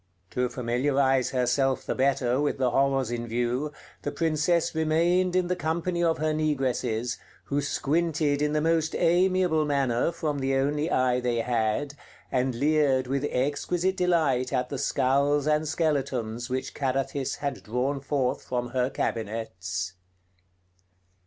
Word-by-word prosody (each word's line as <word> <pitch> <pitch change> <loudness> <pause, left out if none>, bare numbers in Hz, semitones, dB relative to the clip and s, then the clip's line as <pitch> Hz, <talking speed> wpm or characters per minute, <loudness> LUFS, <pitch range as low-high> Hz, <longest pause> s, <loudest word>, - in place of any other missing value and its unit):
To 125 0 0
familiarize 130 +2 +1
herself 130 +1 +1
the - - -1
better 130 -1 +1
with 145 - 0
the 130 -2 +1
horrors 135 -2 +1
in 120 0 -3
view 120 +5 -1 0.3
the - - -3
Princess 165 +1 +1
remained 170 +3 +2
in 185 -1 +3
the 180 +1 -1
company 170 +1 -1
of 165 -1 +2
her 155 0 0
negresses, 130 -6 -1 0.2
who 140 +1 -1
squinted 150 0 0
in 150 0 +1
the 150 - +1
most 160 0 +1
amiable 175 -1 +3
manner 140 -2 +1
from 155 -4 -2
the 135 0 0
only 145 +4 0
eye 125 -3 +2
they 120 -2 0
had, 120 +4 0 0.4
and 130 -1 0
leered 140 -1 +2
with 135 +2 -1
exquisite 165 +8 0
delight 160 -9 +1
at 125 -2 0
the 140 - -4
skulls 140 +4 +2
and 155 0 +1
skeletons 130 -7 -1
which 130 +1 -3
Carathis 135 0 -1
had 140 -1 -4
drawn 125 +5 -1
forth 135 -2 -1
from 125 -1 -3
her 125 +1 0
cabinets.... 95 -7 -3
140 Hz, 140 wpm, -27 LUFS, 125-155 Hz, 0.4 s, in